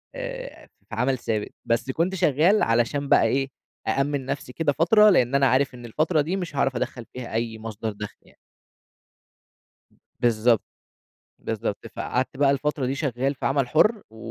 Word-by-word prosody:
آآ، - - -7 0.2
في 105 - -6
عمل 130 +3 +1
ثابت، 110 -3 -3
بس 115 +3 0
كنت 170 +7 0
شغال 175 +3 +3
علشان 120 +5 +1
بقى - - +6
إيه، 135 0 +1 0.4
أأمّن 140 0 0
نفسي 130 -1 -5
كده 160 -3 0
فترة، 210 +8 +5
لإن 135 -7 +3
أنا 140 -1 +4
عارف 130 +1 +2
إن 120 -1 -10
الفترة 155 +6 +1
دي 170 +6 -2
مش 175 -6 -5
هاعرف 135 -1 +1
أدخّل 120 0 -3
فيها 125 -2 -7
أي 115 0 -2
مصدر 110 0 -5
دخل 105 0 -8
يعني. - - -24 1.8
بالضبط، 115 -1 +3 0.8
بالضبط، - - -4
فقعدت 130 +2 -2
بقى 140 0 +4
الفترة 140 0 0
دي 130 - -1
شغّال 135 -1 -1
في - - -4
عمل 135 -2 +1
حُرّ 210 - +3
و 110 - -16
135 Hz, 165 wpm, -24 LUFS, 120-155 Hz, 1.8 s, بقى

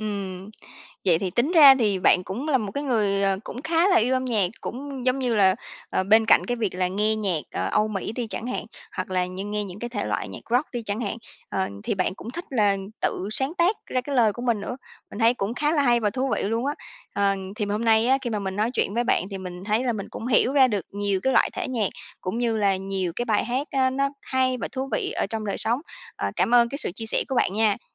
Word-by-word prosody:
Ừm, 200 -2 -4 0.5
vậy 170 -3 +4
thì 185 -1 -2
tính 260 - +1
ra 285 -5 +9
thì 205 -5 +2
bạn 180 - +4
cũng 240 - -4
là 270 - +3
một 210 -4 -4
cái 285 +1 -3
người, 205 -6 +1
ờ, 195 -1 +2
cũng 250 - -7
khá 335 +3 +3
là 380 - +4
yêu 250 +4 +3
âm 260 0 0
nhạc, 215 -7 +1
cũng 265 0 -6
giống 255 +1 +2
như 245 -3 0
là, 190 -3 +5 0.4
ờ, - - +1
bên 220 +3 +5
cạnh - - +5
cái 245 0 -1
việc 215 -6 -2
là 180 0 0
nghe 210 +3 +1
nhạc, 190 -7 0
ờ, - - -2
Âu 215 +1 +2
Mỹ 210 +1 -3
đi 240 -1 -3
chẳng 235 - -1
hạn, 250 - -3 0.3
hoặc - - -3
là 180 -1 +1
như 185 +2 -6
nghe 210 0 -2
những 190 0 -9
cái 240 - -4
thể 205 -4 -3
loại - - -2
nhạc - - -8
rock 250 +5 +2
đi 240 -2 -3
chẳng 205 +2 -2
hạn, 220 -1 -2 0.3
ờ, 190 - -1 0.2
thì - - 0
bạn 185 -1 0
cũng 225 - -8
thích 345 +6 -6
là 210 -6 +3 0.2
tự 190 - -1
sáng 265 +8 0
tác 360 +5 +3
ra 255 - 0
cái 275 +2 -4
lời 220 -4 +4
của 240 - -7
mình 235 -4 +1
nữa. 245 +5 -5 0.3
Mình 205 - -8
thấy 230 +1 +4
cũng 210 +1 -3
khá 295 +4 +1
là 295 -3 +3
hay 240 -2 +3
và 210 -2 +1
thú 260 +2 -1
vị - - -2
luôn 230 +6 -1
á. 290 - 0 0.4
Ờ, 200 -1 +2 0.2
thì 215 - -1
hôm 210 +3 -1
nay 225 +1 +4
á, 265 +1 +4
khi 240 - -2
mà 210 - -1
mình 190 -1 -4
nói 220 +3 +1
chuyện 200 - 0
với 240 +1 +1
bạn 185 - +2
thì 195 - -5
mình 180 0 -7
thấy 215 +4 +1
là 245 - +1
mình 205 -3 -5
cũng 230 - -6
hiểu 250 +2 +3
ra 265 -3 +6
được 205 -6 -2
nhiều 200 -1 -1
cái 265 - +2
loại - - +4
thể - - -3
nhạc 225 -6 0 0.3
cũng 190 +6 -3
như 230 -2 +1
là 200 -2 +2
nhiều 190 -2 -3
cái 240 - -1
bài 220 -3 +1
hát 255 +5 -1
á 260 -1 +2
nó 275 +1 +1
hay 260 -1 +1
và - - -3
thú 265 0 -3
vị - - 0
ở - - -1
trong 220 0 -4
đời 200 - -2
sống. 235 +5 +1 0.4
Ờ, - - -2
cảm 245 - +2
ơn 235 -1 +6
cái 280 - -5
sự 180 - -3
chia 225 - -6
sẻ - - 0
của 265 - -2
bạn 190 - +2
nha! 215 -1 +2
225 Hz, 275 wpm, -25 LUFS, 200-255 Hz, 0.5 s, ra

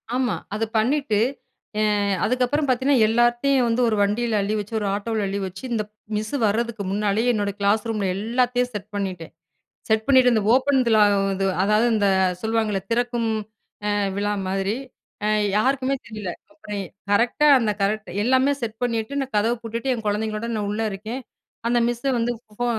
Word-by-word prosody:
ஆமா. 255 -3 +1 0.2
அத 215 - -1
பண்ணிட்டு, 245 -1 +1 0.6
அ - - +2 0.4
அதுக்கப்புறம் 255 +6 +1
பார்த்தீங்கன்னா, 260 0 +3
எல்லாத்தையும் 240 +3 +3
வந்து 230 +2 +1
ஒரு 220 - +1
வண்டியில 215 +2 0
அள்ளி 205 +2 -1
வச்சு 210 +2 -7
ஒரு 205 - -2
ஆட்டோல 210 +1 -2
அள்ளி 195 +1 -2
வச்சு, 190 +4 -10
இந்த 220 -2 0 0.3
மிஸ் 215 +3 -4
வர்றதுக்கு 220 0 -1
முன்னாலேயே, 210 +4 +1
என்னோட 205 -2 -1
கிளாஸ் 205 +2 +2
ரூம்ல 210 -3 -1
எல்லாத்தையும் 245 +3 0
செட் 205 -1 -6
பண்ணிட்டேன். 185 -5 -4 0.6
செட் 220 0 +2
பண்ணிட்டு 260 -2 +5
இந்த 215 - +2
ஓப்பன்விழா, 255 -5 +3 0.6
அதாவது 210 +3 +3
இந்த 205 -2 +2 0.3
சொல்லுவாங்கல்ல 220 -3 0
திறக்கும் 240 -1 0 0.6
அ - - +2 0.3
விழா 205 +1 0 0.2
மாதிரி. 195 +2 -1 0.5
அ - - +2 0.3
யாருக்குமே 265 +4 +1
தெரியல. 210 -5 -5 0.2
அப்புறம் 210 -10 -7
எ - - -6 0.3
கரெக்டா 235 +8 +3
அந்த 225 -4 0
கரெக்ட் 215 -1 -1
எல்லாமே 260 +3 +3
செட் 225 -1 -3
பண்ணிட்டு, 230 +1 -1
நான் 270 -3 -5
கதவ 215 +3 +2
பூட்டிட்டு, 230 +3 -3
என் 225 -2 -6
குழந்தைங்களோட 215 +2 -1
நான் 205 -1 -2
உள்ள 210 +2 -2
இருக்கேன். 220 +7 -6 0.5
அந்த 240 0 +3
மிஸ்ஸ 240 +1 -4
வந்து 235 +1 0 0.3
ஃபோ 245 - 0
225 Hz, 160 wpm, -23 LUFS, 210-245 Hz, 0.6 s, பண்ணிட்டு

